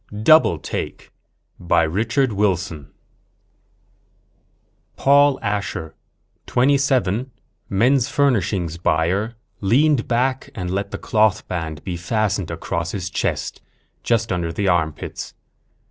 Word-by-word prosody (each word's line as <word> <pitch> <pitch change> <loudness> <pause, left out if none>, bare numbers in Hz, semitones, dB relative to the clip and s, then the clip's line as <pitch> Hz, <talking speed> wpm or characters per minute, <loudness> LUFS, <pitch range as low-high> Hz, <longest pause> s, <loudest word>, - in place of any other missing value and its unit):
_ 105 +1 -6
DOUBLE 155 - +6
TAKE - - -6 0.5
By 85 -1 +2
Richard 115 - 0
Wilson 90 -7 -1
Illustrated 75 - -41
by - - -14
Paul 140 +1 +6
Orban - - -15
_Paul 100 - 0
Asher, 85 -5 -6 0.5
27, 130 -4 +2 0.4
men's 125 +6 +2
furnishings 100 - +1
buyer, 90 +8 0 0.2
leaned 130 +5 +2
back 130 +2 0
and 90 -1 -4
let 100 +2 -2
the - - -5
cloth 110 -2 +1
band 80 -4 -4
be 90 -2 -4
fastened 100 0 -1
across 85 0 -3
his 95 -2 -4
chest, - - -2 0.4
just 115 -2 0
under 85 -2 -1
his 100 +4 -2
armpits. 80 -4 -2
100 Hz, 120 wpm, -21 LUFS, 85-125 Hz, 0.5 s, DOUBLE